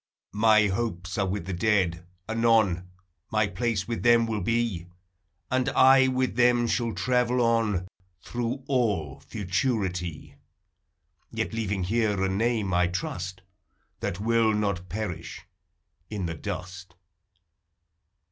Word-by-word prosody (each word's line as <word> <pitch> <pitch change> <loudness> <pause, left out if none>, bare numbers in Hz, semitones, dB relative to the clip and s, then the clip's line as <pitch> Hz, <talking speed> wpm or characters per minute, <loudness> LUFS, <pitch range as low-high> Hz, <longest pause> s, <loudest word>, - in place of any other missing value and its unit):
My 110 0 +5
hopes 95 -3 -2
are 100 - +1
with 95 -2 -3
the 95 - -4
dead; 90 -3 +1 0.2
anon 110 -6 +2 0.4
My 110 0 +3
place 100 +1 -2
with 115 -1 -3
them 120 -1 +5
will 110 -2 -2
be, 110 -4 -1 0.6
And 130 +1 +1
I 130 0 +6
with 130 0 0
them 120 -1 +4
shall 115 0 0
travel 125 +5 +1
on 115 -6 +1 0.4
Through 120 +2 -3
all 105 - 0
futurity: 90 - -2 0.9
Yet - - -3
leaving 105 -4 -1
here 105 0 +1
a 95 - +1
name, 105 -1 0
I 90 0 +3
trust, 95 +1 -4 0.6
That 90 - -3
will 115 0 +2
not 100 -4 -2
perish 100 -1 -5 0.6
in 100 -4 -3
the 85 - -3
dust. 90 +4 -7
105 Hz, 120 wpm, -27 LUFS, 90-115 Hz, 0.9 s, I